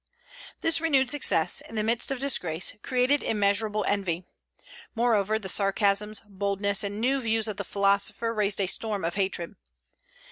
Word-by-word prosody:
This 325 -1 +3
renewed 270 -6 +3
success, 290 - +3
in 225 - -12
the 215 - -1
midst 230 +2 0
of 270 - -2
disgrace, 180 - +1
created 255 +2 +1
immeasurable 210 0 0
envy. 185 -4 -1 0.7
Moreover, 220 -3 +1
the 205 -3 -7
sarcasms, 200 +2 +1
boldness, 200 0 0
and 205 +1 -4
new 265 +4 +1
views 225 -1 0
of 210 -2 -4
the - - -3
philosopher 200 +3 0
raised 210 -2 0
a 195 - +1
storm 205 0 -2
of 170 - -2
hatred. 190 -1 -2
210 Hz, 150 wpm, -26 LUFS, 200-230 Hz, 0.7 s, This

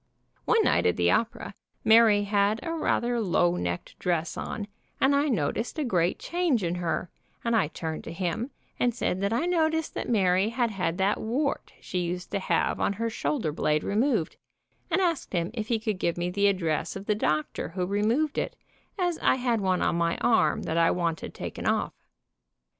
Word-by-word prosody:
One 455 -2 +4
night - - +3
at - - +1
the - - +3
opera, - - -1 0.3
Mary 220 -2 +6
had 205 +1 +2
a 330 - -3
rather 240 -7 0
low 175 -3 +2
necked 85 - -4
dress 170 -2 -1
on, 205 -2 -4 0.3
and 275 +1 +4
I 285 +2 +2
noticed 225 - -1
a 310 - 0
great 180 -8 +1
change 335 - 0
in 170 0 0
her, 170 0 -2 0.3
and 235 -1 +1
I 205 -8 +3
turned 160 0 -5
to - - -6
him 180 +8 -2 0.3
and 240 -2 +1
said 190 -6 -1
that 200 +1 0
I 235 +9 +1
noticed 320 -2 +1
that - - -4
Mary 190 -2 +3
had 235 0 0
had 180 -4 -2
that 195 +2 +1
wart 275 +6 -2
she 180 - -3
used 180 +1 -3
to 200 - 0
have 190 - 0
on - - +1
her 230 +3 -2
shoulder 220 - -1
blade 150 0 0
removed, 220 - 0 0.5
and 350 +2 +2
asked 335 - -1
him 170 +1 0
if 220 -3 -4
he 230 - +1
could 215 -3 -3
give 170 -1 0
me 175 +1 -1
the 200 +2 +2
address 170 -6 0
of 195 +1 -7
the 210 - +2
doctor 155 -9 -1
who 180 +1 -2
removed 220 +10 +1
it, - - -3 0.4
as 355 -3 0
I - - +3
had 245 -4 0
one 185 -1 +1
on - - +1
my 170 0 +1
arm 225 -10 +2
that 165 +1 0
I 165 - +5
wanted 170 -2 -2
taken - - -5
off. - - +1
205 Hz, 195 wpm, -27 LUFS, 175-240 Hz, 0.5 s, Mary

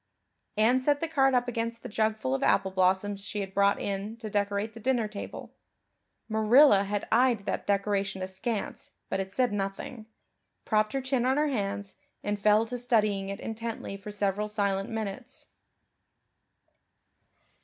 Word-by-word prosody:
Anne 235 +4 +4
set 285 +2 +2
the 330 - -1
card 270 -4 +3
up 245 0 +2
against 230 -1 -3
the - - -5
jugful 215 -10 0
of 135 - -1
apple 190 - +2
blossoms 190 +2 +1
she 205 - -4
had 195 -1 -6
brought 200 0 +3
in 200 +3 -3
to 220 -2 -7
decorate 205 +1 -1
the 230 - -10
dinner 235 -1 +1
table 210 -1 -8 0.7
Marilla 220 0 +5
had 205 0 -2
eyed 235 -3 +3
that - - -3
decoration 195 -1 0
askance, 190 +3 -4 0.2
but - - -1
had 190 0 -3
said 245 0 +1
nothing 205 +4 -4 0.6
propped 215 -1 +1
her 270 - 0
chin 260 -1 0
on 260 +2 +2
her 300 0 +2
hands, 205 -5 -3 0.3
and 205 0 -2
fell 215 +2 +4
to 245 +2 -5
studying 215 -5 +1
it 200 - -5
intently 225 -2 -5
for 200 +1 -9
several 205 0 -1
silent 200 -2 -1
minutes. 225 +4 -5
210 Hz, 155 wpm, -28 LUFS, 200-235 Hz, 0.7 s, Marilla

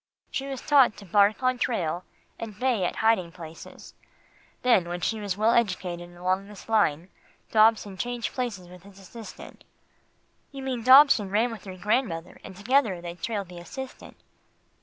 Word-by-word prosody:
She 275 - -3
was 270 -2 -5
taught 275 -7 +5
to 200 - -11
bark 205 +5 +3
on 255 -1 +1
trail, 180 -9 -1 0.4
and 215 -3 -7
bay 245 -7 +1
at - - -2
hiding 185 -7 +3
places. 165 -1 -11 0.7
Then 200 -9 +3
when 175 0 -3
she 220 +5 -1
was 200 -2 -3
well 215 +2 +3
educated 180 -6 -1
along 185 +2 -1
this 210 -1 -13
line, 190 -6 +1 0.4
Dobson 215 -3 +3
changed 240 +2 -3
places 225 -8 -4
with 180 0 -14
his 195 +1 -16
assistant." 210 +3 -12 0.9
"You 275 -1 -8
mean 255 -3 -3
Dobson 255 -4 +7
ran 220 +5 +1
with 225 -3 -9
your 185 -1 -8
grandmother, 185 -4 -1
and 190 - -10
together 220 -2 +1
they 170 0 -7
trailed 200 +2 -4
the 175 -1 -9
assistant." 265 +9 -9
210 Hz, 160 wpm, -26 LUFS, 180-240 Hz, 0.9 s, Dobson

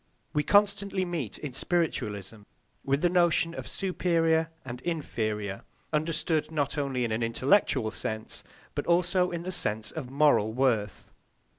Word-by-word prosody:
We 150 - +2
constantly 200 +1 +2
meet, 165 - -3
in 145 -4 -6
spiritualism, 110 - -1 0.4
with 140 +3 0
the - - +6
notion 170 -2 +3
of - - -6
superior 165 -4 +1 0.2
and 125 -1 -7
inferior, 110 - -3 0.3
understood 155 +1 0
not 150 -2 -1
only 135 -4 -1
in 115 - -3
an 110 +2 -1
intellectual 115 - +2
sense 110 0 -5 0.3
but - - -3
also 180 +1 +3
in 170 -1 -4
the 185 - -4
sense 110 - -1
of 150 -6 -6
moral 135 -6 +3
worth. 115 -6 0
150 Hz, 140 wpm, -28 LUFS, 115-170 Hz, 0.4 s, the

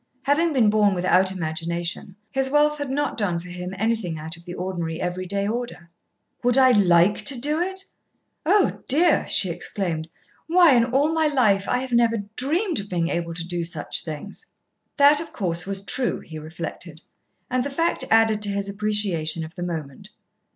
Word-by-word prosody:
Having 310 +4 +2
been 230 -6 +4
born 210 -2 +3
without 185 +1 +3
imagination, 170 +1 -3 0.2
his 270 -1 +1
wealth 295 +1 +2
had 285 -2 -3
not 280 -2 -2
done 180 -5 0
for 180 +1 -10
him 180 +1 -6
anything 220 -5 -1
out 160 +2 -6
of 170 +1 -16
the 175 - -7
ordinary 175 -3 -4
every 180 +1 -3
day 200 +1 -1
order. 220 -7 -5 0.5
"Would 245 +1 +2
I 260 -1 +6
like 185 -2 +4
to 270 -3 0
do 300 +5 0
it? 380 +2 -2 0.6
Oh, 400 +5 +2
dear!" 320 +5 +4
she 185 - +2
exclaimed. 170 -2 -3 0.4
"Why, 340 -3 +6
in 235 -2 +4
all 275 +6 +1
my 320 -1 +2
life 215 -9 +2
I - - +2
have 255 0 -5
never 235 -1 +3 0.2
dreamed 330 - 0
of 200 0 -7
being 170 -2 -1
able 170 -1 -3
to 170 0 -4
do 175 -1 -2
such 165 -3 -3
things." 170 - -8 0.5
That, 290 +1 +6
of 330 - -9
course, 175 -3 -2
was 195 0 -3
true, 245 +7 -1
he 160 -1 -9
reflected, 160 +1 -8 0.5
and 255 0 0
the 285 - -3
fact 330 0 0
added 225 -1 +3
to 205 - +2
his 200 0 -2
appreciation 200 -6 -1
of 160 - -12
the 175 - -9
moment. 160 -6 -6
200 Hz, 185 wpm, -23 LUFS, 175-265 Hz, 0.6 s, I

